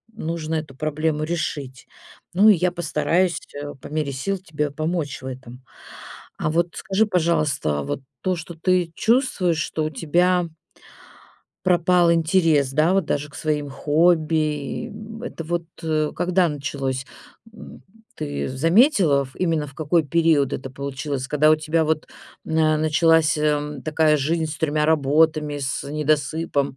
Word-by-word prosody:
м, 190 - -7
нужно 165 -1 -2
эту 150 -4 -5
проблему 155 +1 -1
решить. 145 -5 -4 0.5
Ну, 210 +3 +6
и - - +8
я 180 +1 +1
постараюсь, 175 +1 0 0.2
э, 145 0 -6
по - - -9
мере 150 -2 -2
сил 190 +10 -2
тебе 150 -5 -3
помочь 155 -2 -3
в - - -10
этом. 130 -1 -9 0.7
А - - -1
вот 170 +2 +1
скажи, 200 +3 +1
пожалуйста, 155 - 0
вот 95 - -3 0.2
то, 185 -1 0
что 170 +1 -8
ты 180 0 +1
чувствуешь, 220 - +1
что 155 - -2
у - - -1
тебя 175 +4 +1 1.2
пропал 175 -1 +4
интерес, 160 -4 +2
да, 160 +6 +3
вот 195 -4 +2
даже 150 -1 -2
к 145 - -19
своим 150 -1 -2
хобби, 160 +4 +2
и, 150 - -2
м, 220 +2 -10
это 165 -9 -6
вот, 170 +1 -2 0.2
э, 155 -1 0
когда 180 0 +2
началось, 135 -2 -3 0.5
м? - - -12 0.3
Ты 70 0 -4
заметила, 165 - +3
в 130 - -18
именно 165 -4 0
в 140 - -13
какой 160 +2 +1
период 155 -2 +2
это 130 0 -6
получилось? 135 0 -4
Когда 150 +1 +4
у 155 - +5
тебя 160 +1 0
вот, 155 0 -1 0.4
на 155 -1 +2
началась, 155 0 +3
э, 150 -2 -1
такая 155 0 +3
жизнь 160 +3 0
с 155 - -6
тремя 155 -1 0
работами, 150 0 +2
с 135 -1 -2
недосыпом? 150 -1 -1
155 Hz, 150 wpm, -22 LUFS, 145-170 Hz, 1.2 s, и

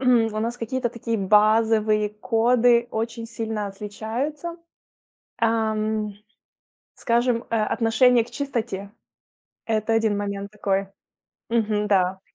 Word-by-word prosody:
у 230 -4 +3
нас 230 +2 -2
какие-то 245 +1 -2
такие 230 -1 -3
базовые 215 +1 +3
коды 235 +2 +2
очень 230 +1 -3
сильно 225 -2 -4
отличаются. 225 - -5 0.8
Ам, 220 -2 0 0.8
скажем, 235 0 +1
э, 230 - 0
отношение 230 +2 +3
к 240 - -16
чистоте. 235 -7 -4 0.7
Это 220 0 0
1 220 -2 +2
момент 200 0 -4
такой. 195 -2 -1 0.6
Мгм, 215 -2 0
да. 190 -2 +2
225 Hz, 100 wpm, -24 LUFS, 210-235 Hz, 0.8 s, у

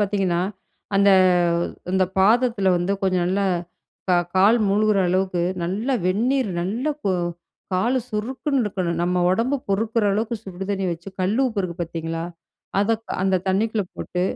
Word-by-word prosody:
பார்த்தீங்கன்னா, 195 -4 +1 0.6
அந்த 200 0 +5 0.8
அந்த 190 0 +3
பாதத்துல 215 -1 +3
வந்து, 175 +3 0
கொஞ்சம் 185 -2 +1
நல்லா 195 +2 +1 0.6
க - - +3 0.2
கால் 210 +5 +5
மூழ்கிற 210 0 +2
அளவுக்கு, 185 -1 0 0.2
நல்லா 215 +10 -1
வெந்நீர் 235 +5 +1
நல்லா 230 - -1
கு 195 - +2 0.6
கால் 235 +8 +1
சுறுக்குன்னு 255 +5 -1
இருக்கணும், 180 -5 -2
நம்ம 180 +1 0
ஒடம்பு 235 +9 +1
பொறுக்குற 220 +3 0
அளவுக்கு 225 +3 -1
சுடு 190 0 -6
தண்ணி 195 -1 -1
வச்சு, 170 +3 -8
கல்லுப்பு 220 +4 +1
இருக்கு 175 -2 -4
பார்த்தீங்களா? 165 0 -4 0.5
அத 205 +3 +2 0.3
அந்த 190 -1 +2
தண்ணிக்குள்ள 210 +1 +1
போட்டு, 180 0 -3
195 Hz, 135 wpm, -22 LUFS, 185-225 Hz, 0.8 s, அந்த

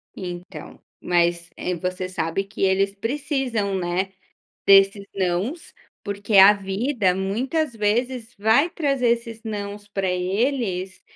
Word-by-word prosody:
Então, 180 -1 -8 0.2
mas, 175 -1 +1
eh, 180 - -2
você 185 +1 -3
sabe 180 +1 -2
que 195 +1 -10
eles 195 +1 +2
precisam, 235 -3 -2
né, 185 +1 -1 0.6
desses 195 +1 +6
nãos, 195 - -2 0.3
porque 205 +1 -1
a 195 +2 +10
vida 200 +1 0
muitas 240 - -1
vezes 235 +3 -1
vai 225 +10 +4
trazer 275 -7 0
esses 230 -1 -2
nãos 205 -1 -5
pra 195 -2 -2
eles, 190 0 -1
200 Hz, 120 wpm, -23 LUFS, 185-235 Hz, 0.6 s, a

